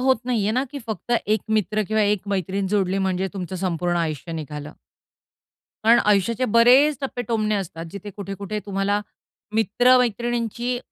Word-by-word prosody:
होत 260 Hz, 0 st, +3 dB
नाहीये 225 Hz, -5 st, 0 dB
ना, 255 Hz, +4 st, +1 dB
की 285 Hz, -, -4 dB
फक्त 220 Hz, +2 st, -4 dB
1 215 Hz, 0 st, +2 dB
मित्र 215 Hz, 0 st, +1 dB
किंवा 215 Hz, 0 st, +2 dB
1 205 Hz, -2 st, +2 dB
मैत्रीण 195 Hz, 0 st, -1 dB
जोडली 195 Hz, -1 st, +1 dB
म्हणजे 190 Hz, 0 st, 0 dB
तुमचं 185 Hz, -1 st, -5 dB
संपूर्ण 175 Hz, -1 st, -1 dB
आयुष्य 165 Hz, 0 st, -3 dB
निघालं. 150 Hz, -1 st, -6 dB, 1.1 s
कारण 235 Hz, +1 st, +6 dB
आयुष्याचे 210 Hz, +4 st, +2 dB
बरेच 250 Hz, +6 st, +5 dB
टप्पे, 260 Hz, -3 st, -3 dB
टोमणे 215 Hz, -2 st, 0 dB
असतात, 170 Hz, -4 st, -4 dB
जिथे 200 Hz, +2 st, -8 dB
कुठे-कुठे 200 Hz, +1 st, -5 dB
तुम्हाला 200 Hz, +1 st, 0 dB, 0.5 s
मित्र-मैत्रिणींची 240 Hz, +1 st, +2 dB
205 Hz, 145 wpm, -23 LUFS, 190-235 Hz, 1.1 s, कारण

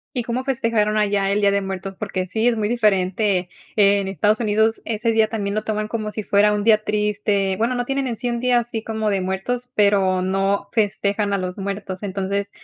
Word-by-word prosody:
¿Y 245 Hz, -2 st, -1 dB
cómo 245 Hz, +1 st, -2 dB
festejaron 230 Hz, -5 st, 0 dB
allá 200 Hz, -2 st, +1 dB
el 205 Hz, -, +1 dB
Día 200 Hz, -1 st, +3 dB
de 200 Hz, -, +2 dB
Muertos? 195 Hz, 0 st, -5 dB
Porque 190 Hz, -3 st, -3 dB
sí, 220 Hz, +6 st, +1 dB
es 235 Hz, -, +1 dB
muy 210 Hz, -1 st, 0 dB
diferente, 195 Hz, -4 st, +1 dB, 0.3 s
en 200 Hz, -1 st, +4 dB
Estados 210 Hz, +4 st, +1 dB
Unidos 220 Hz, 0 st, +1 dB
ese 230 Hz, +1 st, 0 dB
día 220 Hz, -1 st, +3 dB
también, 205 Hz, -3 st, -3 dB
lo 215 Hz, -, -1 dB
toman 215 Hz, -1 st, -2 dB
como 215 Hz, -1 st, -3 dB
si 210 Hz, 0 st, -5 dB
fuera 205 Hz, +1 st, +3 dB
un 205 Hz, -1 st, -1 dB
día 215 Hz, -1 st, +4 dB
triste, 210 Hz, -2 st, 0 dB
bueno, 235 Hz, +3 st, 0 dB
no 245 Hz, -, -1 dB
tienen 270 Hz, +1 st, -1 dB
en 235 Hz, -, -3 dB
sí 245 Hz, -, -3 dB
un 235 Hz, -1 st, -2 dB
día 250 Hz, 0 st, +3 dB
así 230 Hz, -2 st, -3 dB
como 220 Hz, -1 st, -2 dB
de 195 Hz, -1 st, 0 dB
muertos, 195 Hz, +7 st, -3 dB
pero, 195 Hz, -3 st, +3 dB
no 195 Hz, +2 st, 0 dB
festejan 205 Hz, -1 st, 0 dB
a 200 Hz, -, +1 dB
los 185 Hz, 0 st, -4 dB
muertos, 195 Hz, -1 st, -5 dB
entonces, 200 Hz, 0 st, -2 dB
210 Hz, 215 wpm, -21 LUFS, 195-225 Hz, 0.3 s, en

